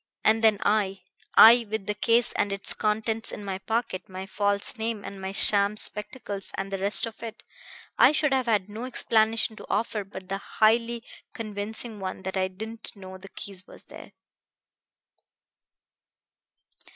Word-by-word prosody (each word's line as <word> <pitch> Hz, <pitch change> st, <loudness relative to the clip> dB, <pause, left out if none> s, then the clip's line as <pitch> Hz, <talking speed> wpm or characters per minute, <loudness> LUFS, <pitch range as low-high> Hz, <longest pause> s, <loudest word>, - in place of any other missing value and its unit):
And 220 Hz, +1 st, +3 dB
then 220 Hz, -2 st, +5 dB
I 195 Hz, -2 st, +1 dB, 0.3 s
I 235 Hz, 0 st, +9 dB
with 215 Hz, -2 st, -3 dB
the 210 Hz, -, -1 dB
case 230 Hz, +3 st, +3 dB
and 205 Hz, -, 0 dB
its 195 Hz, 0 st, 0 dB
contents 220 Hz, +1 st, -1 dB
in 205 Hz, -, -7 dB
my 190 Hz, -1 st, -3 dB
pocket, 220 Hz, -4 st, -3 dB
my 190 Hz, 0 st, -6 dB
false 200 Hz, +1 st, +1 dB
name 225 Hz, -2 st, -3 dB
and 195 Hz, -1 st, -8 dB
my 190 Hz, 0 st, -4 dB
sham 200 Hz, +1 st, +2 dB
spectacles 210 Hz, -2 st, -2 dB
and 195 Hz, 0 st, -4 dB
the 195 Hz, -, -2 dB
rest 200 Hz, +3 st, +2 dB
of 225 Hz, -1 st, -9 dB
it 230 Hz, 0 st, -8 dB, 0.6 s
I -, -, +8 dB
should 300 Hz, -2 st, +1 dB
have 260 Hz, -2 st, +1 dB
had 210 Hz, -4 st, +2 dB
no 215 Hz, +4 st, -6 dB
explanation 225 Hz, -2 st, +2 dB
to -, -, -11 dB
offer 210 Hz, 0 st, -1 dB
but 190 Hz, -1 st, -10 dB
the 195 Hz, +1 st, -3 dB
highly 230 Hz, +3 st, +1 dB, 0.3 s
convincing 215 Hz, +1 st, -5 dB
one 190 Hz, 0 st, -5 dB
that 190 Hz, +1 st, -4 dB
I 190 Hz, 0 st, +1 dB
didn't 220 Hz, +5 st, -7 dB
know 190 Hz, -1 st, -10 dB
the 195 Hz, +1 st, -12 dB
key 200 Hz, +1 st, -7 dB
was -, -, -8 dB
there." -, -, -13 dB
210 Hz, 165 wpm, -26 LUFS, 195-225 Hz, 0.6 s, I